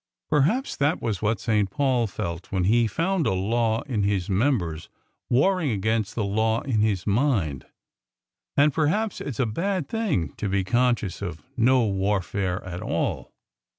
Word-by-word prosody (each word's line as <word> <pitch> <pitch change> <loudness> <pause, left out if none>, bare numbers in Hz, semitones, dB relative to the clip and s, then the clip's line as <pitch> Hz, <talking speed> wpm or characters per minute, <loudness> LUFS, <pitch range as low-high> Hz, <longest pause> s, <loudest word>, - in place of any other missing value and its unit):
"Perhaps 180 - +2
that 145 +4 +1
was 110 -5 -2
what 110 +1 0
St. 105 -4 +1
Paul 130 -1 +1
felt 85 -2 -5
when 95 -2 0
he 115 +4 +3
found 170 - 0
a - - +2
law 110 +3 0
in 120 -7 -2
his 100 -2 0
members 95 - 0 0.4
warring 160 +5 +2
against 110 0 -1
the 110 - 0
law 110 +3 +1
in 115 -6 0
his 100 -4 +1
mind. 100 - 0 0.9
And 145 0 +5
perhaps 180 +9 0
it's 130 -6 -5
a 130 - +3
bad 170 - -2
thing 190 - -1
to 105 - -2
be 95 0 +1
conscious 120 -4 0
of 85 -6 -5
no 125 +1 +4
warfare 95 -2 -1
at 90 -1 -6
all." - - -2
110 Hz, 155 wpm, -25 LUFS, 95-140 Hz, 0.9 s, And